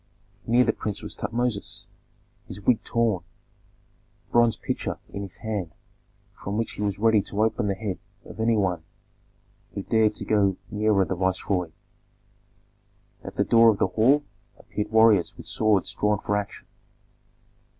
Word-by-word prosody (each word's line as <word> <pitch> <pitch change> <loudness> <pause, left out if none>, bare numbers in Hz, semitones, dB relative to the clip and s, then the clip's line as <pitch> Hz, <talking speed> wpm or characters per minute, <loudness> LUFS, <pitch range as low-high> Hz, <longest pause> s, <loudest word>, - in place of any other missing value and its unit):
Near 120 +2 +5
the 110 - +1
prince 105 -2 -4
was - - -6
Tutmosis, 120 -3 -2 0.6
his 90 - -8
wig 110 +3 +2
torn, 115 -6 0 1.0
a - - -33
bronze 120 -1 +4
pitcher - - -3 0.2
in 100 - -4
his 100 -3 -7
hand 100 -7 -3 0.7
with 100 - -3
which 115 +1 -1
he - - -7
was 100 -2 -1
ready 110 0 +4
to 105 +2 -1
open 110 -2 0
the 100 - 0
head 100 -3 -4 0.3
of - - -11
any 115 0 +2
one 95 -4 0 0.9
who 100 - -3
dared 110 -1 +2
to - - -5
go 100 -3 +2
nearer 105 -2 +2
the - - -2
viceroy. 95 -1 0 1.5
At - - -8
the - - +2
door 115 0 +6
of 105 - +2
the 95 - +1
hall 130 +9 +3 0.3
appeared 105 0 -5
warriors 110 -5 +4
with - - -10
swords 105 -4 +1
drawn 105 0 +1
for 105 +1 -2
action. 105 -1 -4
105 Hz, 155 wpm, -25 LUFS, 100-110 Hz, 1.5 s, door